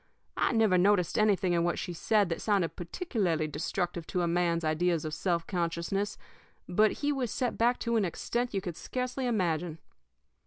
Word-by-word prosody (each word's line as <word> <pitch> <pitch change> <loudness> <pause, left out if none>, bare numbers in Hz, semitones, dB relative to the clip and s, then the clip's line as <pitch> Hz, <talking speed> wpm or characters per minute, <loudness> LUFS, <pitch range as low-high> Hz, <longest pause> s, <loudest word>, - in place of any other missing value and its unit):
I - - +2
never 220 -6 +4
noticed 185 -2 +3
anything 195 -4 +3
in 170 -1 +2
what 175 0 0
she 180 - -4
said 205 +3 +2
that 165 - -3
sounded 200 -6 +1
particularly 175 - -1
destructive 170 +3 -3
to 180 - -1
a - - +1
man's 170 0 +1
ideas 160 +1 +1
of 155 - -4
self 170 +1 0
consciousness; 175 +3 -2 0.5
but 210 +4 +3
he 295 - +3
was 260 -4 -1
set 245 +3 -1
back 240 +2 +2
to 235 -1 +1
an 215 - +2
extent 235 +7 -2
you 195 - 0
could 175 -3 -5
scarcely 255 +5 -3
imagine. 175 -7 0
180 Hz, 180 wpm, -30 LUFS, 170-215 Hz, 0.5 s, never